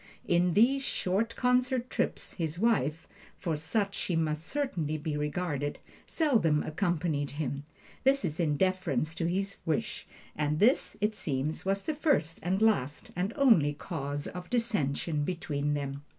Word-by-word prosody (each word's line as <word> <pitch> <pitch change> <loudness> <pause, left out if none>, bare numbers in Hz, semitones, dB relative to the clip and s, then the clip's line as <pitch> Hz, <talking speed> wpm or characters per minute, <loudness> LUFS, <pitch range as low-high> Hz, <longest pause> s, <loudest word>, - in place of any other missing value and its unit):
On 175 0 +3
these 260 +6 +5
short 225 -2 0
concert 250 0 +2
trips - - -2
his 165 -2 -3
wife 170 - +1 0.3
(for 165 -4 -1
such 195 +7 0
she 180 - -2
must 155 -1 0
certainly 175 - -1
be 155 0 -3
regarded) 150 -1 -2 0.3
seldom 220 - +2
accompanied 155 -4 -1
him 140 -1 -3 0.4
this 270 - +2
in 150 -4 +1
deference 180 -6 +1
to 165 0 -1
his 195 +3 -1
wish, 160 -2 -2 0.3
and 150 0 0
this, 235 - +3
it 210 +1 +2
seems, 155 -5 -2
was 195 +1 0
the 315 - -1
first 280 - +1
and 190 +5 +1
last 150 -11 +1
and 185 +4 -1
only 220 - +5
cause 145 -3 -4
of 180 0 -7
dissension 170 - 0
between 150 -4 -1
them. 140 -1 -4
170 Hz, 145 wpm, -30 LUFS, 150-210 Hz, 0.4 s, these